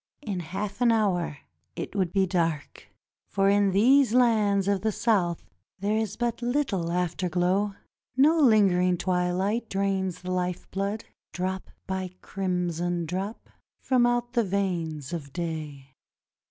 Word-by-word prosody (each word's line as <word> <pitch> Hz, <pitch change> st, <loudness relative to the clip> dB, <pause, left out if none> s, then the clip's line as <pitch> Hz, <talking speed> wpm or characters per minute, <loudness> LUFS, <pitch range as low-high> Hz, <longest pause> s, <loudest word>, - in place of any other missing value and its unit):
In 200 Hz, -7 st, -3 dB
half 195 Hz, +6 st, -5 dB
an 240 Hz, -1 st, +5 dB
hour 190 Hz, -9 st, +1 dB, 0.4 s
it -, -, -6 dB
would 185 Hz, -4 st, 0 dB
be 195 Hz, 0 st, +3 dB
dark, 165 Hz, -5 st, -2 dB, 0.4 s
for 195 Hz, 0 st, +2 dB
in 200 Hz, 0 st, +3 dB
these 245 Hz, +5 st, +4 dB
lands 210 Hz, -5 st, +3 dB
of 200 Hz, -2 st, +1 dB
the 220 Hz, +1 st, +1 dB
South 195 Hz, -7 st, 0 dB, 0.3 s
there 200 Hz, +3 st, 0 dB
is 220 Hz, -2 st, -2 dB
but 240 Hz, 0 st, -1 dB
little 240 Hz, -, 0 dB
afterglow. 180 Hz, +3 st, 0 dB, 0.4 s
No 310 Hz, +5 st, +5 dB
lingering 190 Hz, -, +4 dB
twilight 185 Hz, +6 st, 0 dB
drains 195 Hz, -2 st, -1 dB
the 185 Hz, -, -4 dB
life 180 Hz, -1 st, -2 dB
blood, 200 Hz, +3 st, -2 dB, 0.3 s
drop 185 Hz, +1 st, -3 dB, 0.2 s
by 190 Hz, -1 st, -3 dB
crimson 175 Hz, -2 st, -2 dB
drop, 190 Hz, +6 st, -4 dB, 0.4 s
from 250 Hz, -2 st, +3 dB
out 240 Hz, 0 st, 0 dB
the 235 Hz, -2 st, +3 dB
veins 175 Hz, -6 st, -2 dB
of 145 Hz, -5 st, -5 dB
day. 155 Hz, -5 st, -5 dB
190 Hz, 135 wpm, -27 LUFS, 180-215 Hz, 0.4 s, an